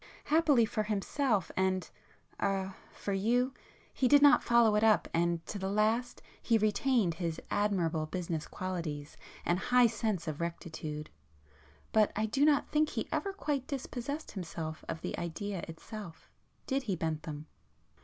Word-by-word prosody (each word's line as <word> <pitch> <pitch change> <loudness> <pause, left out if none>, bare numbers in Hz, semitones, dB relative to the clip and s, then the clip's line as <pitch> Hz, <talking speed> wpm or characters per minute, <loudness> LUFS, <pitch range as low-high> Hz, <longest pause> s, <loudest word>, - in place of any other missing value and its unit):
Happily 295 -6 +4
for 215 0 -1
himself 215 - 0
and—er—for 190 +1 -3
you, 245 +6 +2 0.4
he 260 - +2
did 285 +2 +6
not 290 0 +8
follow 235 -2 +5
it 210 - +3
up, 220 -1 +4
and 170 0 +1
to 205 - -5
the 190 0 -2
last 220 +4 +1 0.2
he 230 - +3
retained 215 -2 +2
his 165 -1 -3
admirable 170 -7 +1
business 165 -2 -3
qualities 165 -6 -4 0.3
and 175 +1 +2
high 250 +5 +4
sense 215 -6 -1
of 155 0 -3
rectitude. 160 -2 -5 0.8
But 215 -1 +4
I 215 - +1
do 270 +7 +2
not 295 -2 +4
think 305 0 +2
he - - -3
ever 395 - -1
quite 295 -9 -2
dispossessed 280 +1 -4
himself 165 -4 -5
of 165 -1 -4
the - - -3
idea 185 +3 -3
itself, 170 +1 -9 0.3
did 270 0 0
he 210 -8 -2
Bentham?" 155 -2 -4
205 Hz, 145 wpm, -32 LUFS, 170-245 Hz, 0.8 s, not